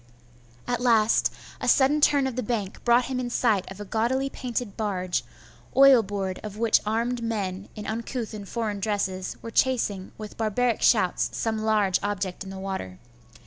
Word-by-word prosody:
At 245 Hz, 0 st, -1 dB
last, 230 Hz, -3 st, +3 dB, 0.3 s
a -, -, -3 dB
sudden 290 Hz, +3 st, +4 dB
turn 285 Hz, -2 st, +4 dB
of 260 Hz, -3 st, -2 dB
the 255 Hz, -, -1 dB
bank 210 Hz, -4 st, -3 dB
brought 240 Hz, +1 st, +4 dB
him 255 Hz, -1 st, -3 dB
in 245 Hz, -1 st, -2 dB
sight 220 Hz, -5 st, +1 dB
of 195 Hz, -, -9 dB
a 205 Hz, -, -6 dB
gaudily 250 Hz, +6 st, 0 dB
painted 240 Hz, -4 st, -4 dB
barge, 185 Hz, -4 st, -1 dB, 0.5 s
oil 270 Hz, -3 st, +8 dB
board 195 Hz, -2 st, -4 dB
of 210 Hz, -1 st, -7 dB
which 225 Hz, 0 st, +3 dB
armed 235 Hz, +3 st, 0 dB
men, 200 Hz, -4 st, -3 dB
in 210 Hz, -, -7 dB
uncouth 230 Hz, +1 st, -4 dB
and 205 Hz, -2 st, -8 dB
foreign 220 Hz, -4 st, -2 dB
dresses, 195 Hz, -2 st, -2 dB
were 230 Hz, -, -6 dB
chasing 225 Hz, -7 st, +1 dB
with 215 Hz, -1 st, -9 dB
barbaric 230 Hz, +2 st, 0 dB
shouts -, -, +3 dB
some 220 Hz, -1 st, -1 dB
large 215 Hz, -4 st, +2 dB
object 200 Hz, -2 st, -3 dB
in 190 Hz, -, -9 dB
the 195 Hz, -, -7 dB
water. 190 Hz, -, -5 dB
220 Hz, 175 wpm, -26 LUFS, 200-245 Hz, 0.5 s, oil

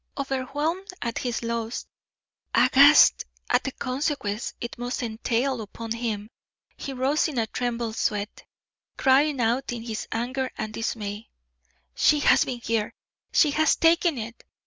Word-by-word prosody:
Overwhelmed 290 Hz, +7 st, -2 dB, 0.2 s
at 235 Hz, -1 st, -2 dB
his 240 Hz, -2 st, -3 dB
loss, 230 Hz, 0 st, -3 dB, 0.7 s
aghast 285 Hz, +2 st, +7 dB, 0.3 s
at -, -, +3 dB
the 270 Hz, -, -3 dB
consequences 255 Hz, -5 st, -3 dB
it 235 Hz, 0 st, -6 dB
must 245 Hz, +2 st, -3 dB
entail 235 Hz, +2 st, -1 dB
upon 225 Hz, +2 st, -8 dB
him, 225 Hz, -3 st, -2 dB, 0.5 s
he 275 Hz, -, -6 dB
rose 270 Hz, +3 st, +1 dB
in 295 Hz, -5 st, -5 dB
a 225 Hz, -, +2 dB
trembling 235 Hz, 0 st, -3 dB
sweat, 210 Hz, -1 st, -2 dB, 0.5 s
crying 275 Hz, +1 st, +3 dB
out 240 Hz, +3 st, 0 dB
in 235 Hz, -2 st, -5 dB
his 225 Hz, -2 st, -5 dB
anger 255 Hz, +3 st, -2 dB
and 215 Hz, 0 st, -4 dB
dismay: 215 Hz, -1 st, -4 dB, 0.6 s
"She 300 Hz, -, +4 dB
has -, -, +5 dB
been 245 Hz, -2 st, -5 dB
here! 225 Hz, -2 st, -1 dB, 0.4 s
She 300 Hz, -, +4 dB
has 315 Hz, +2 st, +3 dB
taken 330 Hz, -2 st, +3 dB
it!" 230 Hz, +1 st, -7 dB
245 Hz, 140 wpm, -25 LUFS, 225-275 Hz, 0.7 s, aghast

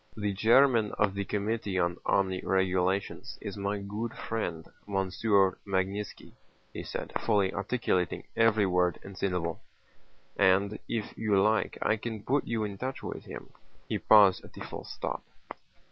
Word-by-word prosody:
"The 105 Hz, -1 st, -1 dB
chairman 115 Hz, +1 st, +4 dB
of 105 Hz, -2 st, +1 dB
the 100 Hz, 0 st, -3 dB
Committee 105 Hz, -1 st, -2 dB
on 85 Hz, -1 st, +1 dB
Army 95 Hz, -2 st, +2 dB
Regulations 95 Hz, 0 st, 0 dB
is 100 Hz, -, -6 dB
my 100 Hz, 0 st, -2 dB
good 105 Hz, +3 st, -5 dB
friend 85 Hz, -8 st, -4 dB, 0.2 s
Monsieur 95 Hz, 0 st, +2 dB
Magnítski," 100 Hz, +1 st, -3 dB, 0.4 s
he -, -, -5 dB
said, -, -, -5 dB
fully 100 Hz, -2 st, +2 dB
articulating 100 Hz, -4 st, -1 dB
every 110 Hz, -2 st, +4 dB
word 90 Hz, -1 st, +2 dB
and 100 Hz, 0 st, -10 dB
syllable, 90 Hz, -4 st, -2 dB, 0.7 s
"and 100 Hz, +2 st, +3 dB
if 110 Hz, -2 st, -3 dB
you 105 Hz, -3 st, +2 dB
like 110 Hz, +3 st, +2 dB
I 110 Hz, -, +2 dB
can 110 Hz, -1 st, -5 dB
put 140 Hz, +2 st, 0 dB
you 115 Hz, -2 st, -1 dB
in 100 Hz, -2 st, -5 dB
touch 130 Hz, +1 st, -4 dB
with -, -, -6 dB
him." -, -, -9 dB, 0.4 s
He -, -, -1 dB
paused 100 Hz, -4 st, +6 dB
at -, -, -14 dB
the -, -, -10 dB
full -, -, -7 dB
stop. -, -, -4 dB
100 Hz, 150 wpm, -29 LUFS, 95-110 Hz, 0.7 s, paused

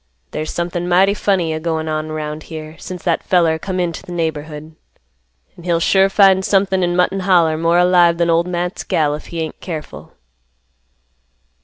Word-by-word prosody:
There's 155 Hz, +1 st, -4 dB
somethin' 175 Hz, 0 st, -3 dB
mighty 190 Hz, +3 st, +4 dB
funny 190 Hz, -6 st, 0 dB
a 155 Hz, -, -3 dB
goin' 160 Hz, -1 st, -2 dB
on 155 Hz, 0 st, -3 dB
around 155 Hz, 0 st, -5 dB
here, 155 Hz, -1 st, -8 dB
since 180 Hz, -1 st, -8 dB
that 170 Hz, -2 st, 0 dB
feller 165 Hz, -3 st, +2 dB
come 185 Hz, +1 st, -4 dB
int' 175 Hz, -2 st, -1 dB
th' -, -, -13 dB
neighborhood; 155 Hz, -2 st, -4 dB, 0.8 s
an' 175 Hz, -, -14 dB
he'll 170 Hz, -1 st, +1 dB
sure 190 Hz, +3 st, +3 dB
find 195 Hz, -1 st, +4 dB
somethin' 190 Hz, -1 st, +1 dB
in 175 Hz, -1 st, 0 dB
Mutton 180 Hz, +2 st, +1 dB
Holler 175 Hz, -4 st, +3 dB
more 165 Hz, +2 st, +2 dB
alive 175 Hz, -1 st, +4 dB
than 170 Hz, 0 st, +2 dB
Ol' 165 Hz, +1 st, +2 dB
Matt's 180 Hz, 0 st, -3 dB
gal 150 Hz, -2 st, 0 dB
if 150 Hz, -, -7 dB
he 165 Hz, -1 st, -5 dB
ain't 160 Hz, -1 st, -6 dB
careful." 160 Hz, -4 st, -8 dB
170 Hz, 175 wpm, -18 LUFS, 160-180 Hz, 0.8 s, mighty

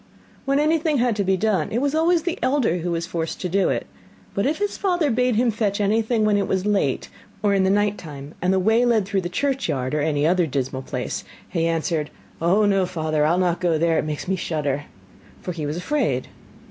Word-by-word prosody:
When 275 Hz, 0 st, +2 dB
anything 310 Hz, 0 st, +2 dB
had 240 Hz, -2 st, +2 dB
to 200 Hz, -, +1 dB
be 190 Hz, 0 st, +2 dB
done, 195 Hz, -5 st, 0 dB
it 225 Hz, -, 0 dB
was 280 Hz, +3 st, 0 dB
always 325 Hz, +1 st, +3 dB
the 350 Hz, -1 st, -2 dB
elder 255 Hz, -, +2 dB
who 175 Hz, +1 st, -3 dB
was 170 Hz, -1 st, -1 dB
forced 165 Hz, -1 st, -4 dB
to 185 Hz, -, -1 dB
do 195 Hz, +2 st, +2 dB
it; -, -, -1 dB, 0.5 s
but 200 Hz, +6 st, 0 dB
if 305 Hz, +2 st, 0 dB
his 410 Hz, 0 st, -1 dB
father 350 Hz, -7 st, +1 dB
bade 250 Hz, 0 st, +2 dB
him 235 Hz, +1 st, +3 dB
fetch 210 Hz, -2 st, -1 dB
anything 220 Hz, +2 st, +1 dB
when 210 Hz, -1 st, +3 dB
it 200 Hz, -, 0 dB
was 190 Hz, 0 st, 0 dB
late, 200 Hz, -10 st, 0 dB, 0.3 s
or 205 Hz, -1 st, +3 dB
in 195 Hz, -1 st, +3 dB
the 190 Hz, -, +3 dB
night 205 Hz, +1 st, +1 dB
time, 145 Hz, -2 st, -9 dB
and 180 Hz, +1 st, +2 dB
the 190 Hz, -, +3 dB
way 220 Hz, +5 st, +3 dB
led 230 Hz, -5 st, +3 dB
through 195 Hz, 0 st, 0 dB
the 175 Hz, -, -4 dB
churchyard, 170 Hz, -, -1 dB
or 150 Hz, -, +1 dB
any 145 Hz, -1 st, +1 dB
other 175 Hz, 0 st, +3 dB
dismal 130 Hz, -1 st, -2 dB
place, -, -, -4 dB, 0.2 s
he 165 Hz, 0 st, 0 dB
answered: 160 Hz, -2 st, -1 dB, 0.3 s
'Oh, 190 Hz, +6 st, +3 dB
no 195 Hz, -2 st, +2 dB
father, 155 Hz, -3 st, 0 dB
I'll 170 Hz, +3 st, +2 dB
not 180 Hz, -2 st, +1 dB
go 170 Hz, -3 st, +2 dB
there, 165 Hz, 0 st, +2 dB
it -, -, -1 dB
makes 150 Hz, +3 st, -4 dB
me 190 Hz, -, +1 dB
shudder!' 145 Hz, -5 st, -2 dB, 0.5 s
for 180 Hz, -, -5 dB
he 160 Hz, -4 st, -4 dB
was 150 Hz, +3 st, -3 dB
afraid. 180 Hz, -, -1 dB
190 Hz, 225 wpm, -23 LUFS, 165-230 Hz, 0.5 s, always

